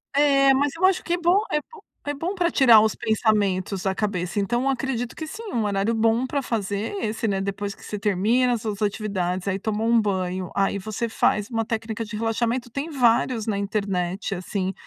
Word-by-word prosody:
É, 275 Hz, -2 st, +5 dB
mas 280 Hz, +1 st, +2 dB
eu 370 Hz, +3 st, +2 dB
acho 375 Hz, -1 st, +3 dB
que 345 Hz, -, -1 dB
é -, -, +2 dB
bom 355 Hz, +4 st, +3 dB
é 300 Hz, -, +1 dB
bom 460 Hz, +6 st, -16 dB, 0.3 s
é 290 Hz, -, -1 dB
bom 340 Hz, +7 st, -3 dB
pra 350 Hz, -2 st, +1 dB
tirar 235 Hz, -6 st, +7 dB
os 220 Hz, -, +2 dB
pensamentos 200 Hz, -4 st, 0 dB
da 190 Hz, -1 st, 0 dB
cabeça. 185 Hz, -3 st, -2 dB
Então, 240 Hz, +5 st, 0 dB
eu 275 Hz, -, +1 dB
acredito 250 Hz, -2 st, -2 dB
que 315 Hz, -, -5 dB
sim. 405 Hz, +8 st, -8 dB
Um 230 Hz, -2 st, +1 dB
horário 205 Hz, +2 st, 0 dB
bom 225 Hz, +3 st, +2 dB
pra 280 Hz, 0 st, -1 dB
fazer 210 Hz, -, -2 dB
é -, -, -2 dB
esse, 220 Hz, 0 st, -2 dB
né. 195 Hz, -, 0 dB
Depois 200 Hz, +1 st, -3 dB
que -, -, -19 dB
você 210 Hz, -, -5 dB
termina 215 Hz, +6 st, +2 dB
as 230 Hz, -, -2 dB
suas 215 Hz, -1 st, -4 dB
atividades. 200 Hz, -3 st, -1 dB
Aí 195 Hz, -1 st, 0 dB
toma 220 Hz, +2 st, -2 dB
um 230 Hz, -1 st, +4 dB
banho. 185 Hz, -3 st, -2 dB
Aí 195 Hz, 0 st, +1 dB
você 215 Hz, +4 st, -3 dB
faz 210 Hz, -1 st, +1 dB
uma 225 Hz, -1 st, -1 dB
técnica 225 Hz, 0 st, -3 dB
de 210 Hz, -1 st, -6 dB
relaxamento 235 Hz, +2 st, -1 dB
tem 280 Hz, +7 st, -4 dB
vários 240 Hz, -4 st, +2 dB
na 205 Hz, -2 st, 0 dB
internet 195 Hz, -2 st, -2 dB
assim, 190 Hz, +1 st, -3 dB
220 Hz, 215 wpm, -24 LUFS, 200-255 Hz, 0.3 s, tirar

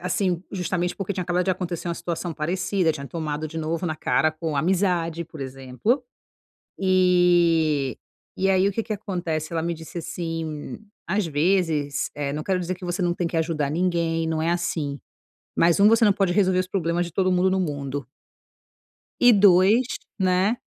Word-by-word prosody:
assim, 180 Hz, -1 st, -1 dB
justamente 180 Hz, -1 st, -1 dB
porque 200 Hz, 0 st, -3 dB
tinha 185 Hz, -, -3 dB
acabado 180 Hz, +1 st, 0 dB
de 190 Hz, -, +1 dB
acontecer 175 Hz, -2 st, -3 dB
uma 170 Hz, -, -1 dB
situação 170 Hz, 0 st, -4 dB
parecida, 175 Hz, +2 st, 0 dB
tinha 140 Hz, -2 st, -7 dB
tomado 155 Hz, -1 st, -4 dB
de 160 Hz, -, -6 dB
novo 160 Hz, +3 st, -2 dB
na 155 Hz, -2 st, -2 dB
cara 155 Hz, -, +2 dB
com 155 Hz, -1 st, -4 dB
amizade, 170 Hz, 0 st, 0 dB
por 160 Hz, -2 st, -12 dB
exemplo. 135 Hz, -, -2 dB, 0.8 s
E 175 Hz, -, +3 dB, 0.4 s
e 195 Hz, +1 st, +2 dB
aí, 190 Hz, 0 st, +3 dB
o -, -, -2 dB
que 225 Hz, -, -1 dB
que 220 Hz, 0 st, -5 dB
acontece, 175 Hz, -7 st, -3 dB
ela 165 Hz, -1 st, -1 dB
me 170 Hz, 0 st, -1 dB
disse 160 Hz, +2 st, -8 dB
assim: 165 Hz, -2 st, -5 dB, 0.3 s
"Às 190 Hz, 0 st, 0 dB
vezes 155 Hz, -3 st, 0 dB
eh, 145 Hz, -1 st, -3 dB
não 150 Hz, +1 st, -3 dB
quero 185 Hz, 0 st, 0 dB
dizer 180 Hz, +1 st, -2 dB
que 180 Hz, 0 st, -11 dB
você 175 Hz, +2 st, -3 dB
não 175 Hz, 0 st, +1 dB
tem 175 Hz, -1 st, -2 dB
que 170 Hz, -, -4 dB
ajudar 160 Hz, -3 st, 0 dB
ninguém, 165 Hz, -1 st, 0 dB
não 160 Hz, -1 st, -1 dB
é 165 Hz, -, +1 dB
assim. 160 Hz, -5 st, -2 dB, 0.6 s
Mas 170 Hz, +1 st, +3 dB
1: 200 Hz, -, +7 dB
você 225 Hz, +1 st, +5 dB
não 205 Hz, -, +5 dB
pode 195 Hz, -3 st, +1 dB
resolver 185 Hz, -2 st, +3 dB
os 185 Hz, -, -1 dB
problemas 175 Hz, -2 st, -1 dB
de 170 Hz, -, -8 dB
todo 185 Hz, -1 st, +2 dB
mundo 180 Hz, +1 st, +3 dB
no 190 Hz, -, +1 dB
mundo." 140 Hz, -5 st, -3 dB, 1.1 s
"E 245 Hz, 0 st, +7 dB
2, 200 Hz, +4 st, +5 dB, 0.3 s
né: 190 Hz, +4 st, +2 dB
175 Hz, 185 wpm, -24 LUFS, 160-185 Hz, 1.1 s, 1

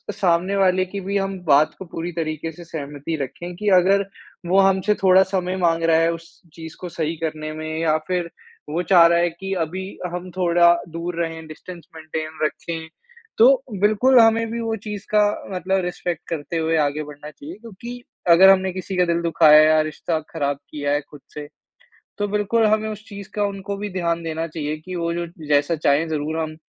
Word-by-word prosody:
सामने 180 Hz, +2 st, +1 dB
वाले 185 Hz, -1 st, +3 dB
की 200 Hz, +2 st, -6 dB
भी 200 Hz, 0 st, 0 dB
हम 195 Hz, 0 st, -2 dB
बात 150 Hz, +1 st, +4 dB
को 190 Hz, -, -7 dB
पूरी 170 Hz, +1 st, -5 dB
तरीके 160 Hz, -1 st, -3 dB
से 175 Hz, +2 st, -12 dB
सहमति 145 Hz, 0 st, -5 dB
रखें 175 Hz, +6 st, -6 dB
कि 210 Hz, +3 st, -5 dB
अगर 195 Hz, +2 st, +3 dB, 0.4 s
वो 195 Hz, +2 st, +4 dB
हमसे 195 Hz, +2 st, +3 dB
थोड़ा 190 Hz, 0 st, +6 dB
समय 185 Hz, -1 st, -2 dB
माँग 165 Hz, -2 st, +1 dB
रहा 165 Hz, -1 st, +4 dB
है 165 Hz, 0 st, +3 dB
उस 165 Hz, 0 st, -12 dB
चीज़ 160 Hz, -1 st, -9 dB
को 180 Hz, -, -5 dB
सही 165 Hz, 0 st, -3 dB
करने 155 Hz, -1 st, -3 dB
में 155 Hz, 0 st, -5 dB
या 155 Hz, -1 st, +2 dB
फिर, 180 Hz, -2 st, -1 dB, 0.4 s
वो 165 Hz, +4 st, -1 dB
चाह 175 Hz, -1 st, +6 dB
रहा 170 Hz, 0 st, +3 dB
है 175 Hz, 0 st, +2 dB
की 195 Hz, +4 st, -6 dB
अभी 185 Hz, +4 st, -6 dB, 0.3 s
हम 180 Hz, +1 st, -5 dB
थोड़ा 170 Hz, -1 st, +5 dB, 0.2 s
दूर 170 Hz, +1 st, -5 dB
रहें 165 Hz, -1 st, -6 dB
डिस्टेंस 170 Hz, +2 st, -11 dB
मेंटेन 160 Hz, 0 st, -6 dB
रखें, 160 Hz, +1 st, -3 dB, 0.5 s
तो 260 Hz, +3 st, +6 dB, 0.2 s
बिल्कुल, 230 Hz, +5 st, +5 dB
हमें 225 Hz, 0 st, +4 dB
भी 235 Hz, 0 st, -3 dB
वो 225 Hz, -1 st, -2 dB
चीज़ 210 Hz, 0 st, -6 dB
का 210 Hz, -, +6 dB, 0.3 s
मतलब 190 Hz, +2 st, 0 dB
रिस्पेक्ट 175 Hz, -1 st, -4 dB
करते 165 Hz, +1 st, -4 dB
हुए 160 Hz, 0 st, +1 dB
आगे 150 Hz, +2 st, -4 dB
बढ़ना 150 Hz, 0 st, -10 dB
चाहिए। 150 Hz, +4 st, -10 dB
क्योंकि 235 Hz, +2 st, -9 dB, 0.3 s
अगर 185 Hz, +3 st, +8 dB
हमने 190 Hz, -1 st, +4 dB
किसी 185 Hz, 0 st, -5 dB
का 180 Hz, -, +4 dB
दिल 170 Hz, 0 st, 0 dB
दुखाया 155 Hz, -2 st, +6 dB
या 155 Hz, 0 st, +5 dB
रिश्ता 160 Hz, 0 st, -2 dB
ख़राब 140 Hz, 0 st, -1 dB
किया 145 Hz, -1 st, -2 dB
है 145 Hz, -, +1 dB
खुद 145 Hz, -, -13 dB
से, 150 Hz, -1 st, -7 dB, 0.7 s
तो 205 Hz, 0 st, -1 dB
बिल्कुल 210 Hz, +2 st, +1 dB
हमें 215 Hz, 0 st, +1 dB
उस 215 Hz, 0 st, -7 dB
चीज़ 200 Hz, -1 st, -9 dB
का 205 Hz, -, +1 dB
उनको 200 Hz, 0 st, -4 dB
भी 205 Hz, 0 st, -4 dB
ध्यान 170 Hz, -2 st, -1 dB
देना 160 Hz, 0 st, -3 dB
चाहिए 155 Hz, -1 st, -4 dB
कि 180 Hz, +4 st, -8 dB
वो 170 Hz, 0 st, -1 dB
जो 170 Hz, 0 st, -3 dB, 0.2 s
जैसा 145 Hz, +3 st, +2 dB
चाहे 150 Hz, +1 st, +2 dB
ज़रूर 155 Hz, +1 st, -2 dB
हम 155 Hz, -1 st, -4 dB
170 Hz, 200 wpm, -22 LUFS, 160-195 Hz, 0.7 s, अगर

